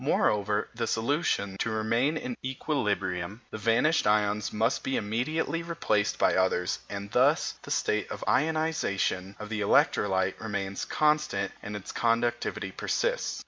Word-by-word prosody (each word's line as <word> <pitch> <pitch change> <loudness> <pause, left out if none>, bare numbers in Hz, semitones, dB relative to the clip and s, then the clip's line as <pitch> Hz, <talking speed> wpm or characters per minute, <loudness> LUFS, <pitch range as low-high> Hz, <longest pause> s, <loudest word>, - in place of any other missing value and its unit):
Moreover, 105 -6 +1
for - - -21
the 115 - 0
solution 115 - 0
to - - 0
remain 115 +7 +1
in 250 0 -4
equilibrium, 105 - -2
the 110 - -5
vanished 115 +7 +3
ions 105 0 +2
must 110 +3 +1
be 135 - 0
immediately 130 +10 -1
replaced 165 -12 0
by - - +3
others, 95 -1 +1
and 100 0 -6
thus - - +3
the - - -11
state 105 -2 0
of - - -6
ionisation 140 - 0
of 105 -1 -7
the 110 -2 -2
electrolyte 95 -2 +2
remains 100 -3 -3
constant 150 -10 +1
and 105 - -6
its 105 - -6
conductivity 120 +1 0
persists. - - -1
110 Hz, 145 wpm, -28 LUFS, 100-140 Hz, -, vanished